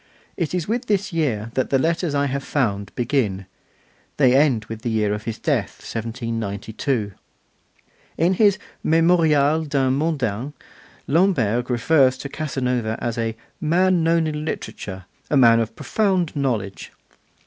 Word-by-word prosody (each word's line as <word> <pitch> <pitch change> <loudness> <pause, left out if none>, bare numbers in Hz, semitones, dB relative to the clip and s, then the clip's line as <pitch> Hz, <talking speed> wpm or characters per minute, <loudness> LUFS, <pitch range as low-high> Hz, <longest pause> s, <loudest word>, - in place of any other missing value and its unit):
It 170 -1 -2
is 175 -3 -2
with 240 +3 -2
this 200 -3 0
year 115 -9 -1
that 130 - 0
the 135 - +3
letters 165 +2 0
I 140 0 +2
have 140 0 -2
found 100 -10 -1
begin: 115 -7 0 0.7
they 130 -3 +5
end 135 -6 +3
with 115 -1 -7
the 120 - -2
year 105 -2 +1
of 105 +1 -5
his 115 - -3
death, - - -2
1792. 115 0 -3 1.1
In 175 +3 +3
his 200 0 +4 0.3
'Memorial 160 -2 +3
d'un 135 -3 +1
Mondain' 140 -4 -1 0.5
Lamberg 130 - +2
refers 130 +2 +3
to 140 - -7
Casanova 125 -6 -2
as 120 -1 -3
'a 115 -1 -2 0.2
man 175 +2 +3
known 165 0 +3
in 150 -1 -3
literature, 95 - -6 0.2
a 145 - +3
man 115 -3 +6
of 115 -1 -2
profound 180 - 0
knowledge. 115 -9 -2
135 Hz, 140 wpm, -22 LUFS, 115-160 Hz, 1.1 s, man